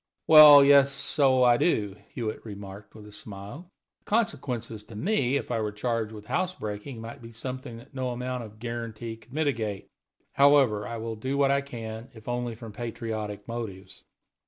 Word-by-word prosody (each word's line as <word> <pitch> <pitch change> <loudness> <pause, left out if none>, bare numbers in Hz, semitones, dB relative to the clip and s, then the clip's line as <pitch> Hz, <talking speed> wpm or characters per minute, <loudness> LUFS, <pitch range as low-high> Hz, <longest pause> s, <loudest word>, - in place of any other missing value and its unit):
"Well, 150 -3 +10
yes, 140 -1 +6
so 135 -1 +2
I 120 -1 +5
do," 105 - +1
Hewitt 110 -3 -5
remarked, 100 -1 -10
with 105 -1 -12
a 105 - -12
smile. 105 - -9 0.3
"The - - -20
consequences 130 - -1
to 110 - -12
me, 140 - +1
if 140 - -5
I 115 -2 0
were 105 -1 -2
charged 110 +1 -2
with 105 -1 -10
house 185 - -1
breaking, 105 - -6
might 115 +4 -9
be 115 0 -11
something 125 0 -6
that 115 - -15
no 130 -2 -2
amount 125 0 -4
of 110 -1 -12
guarantee 115 -1 -6
could 115 +2 -22
mitigate. 115 -9 -2 0.4
However, 135 -7 +4
I 115 - -5
will 115 0 -4
do 130 +5 -2
what 140 -1 +3
I 140 0 +2
can, 115 -3 -8
if 110 -1 -14
only 120 -1 -2
from 115 0 -9
patriotic 110 -3 -5
motives. 110 -5 -7
115 Hz, 180 wpm, -27 LUFS, 110-135 Hz, 0.4 s, Well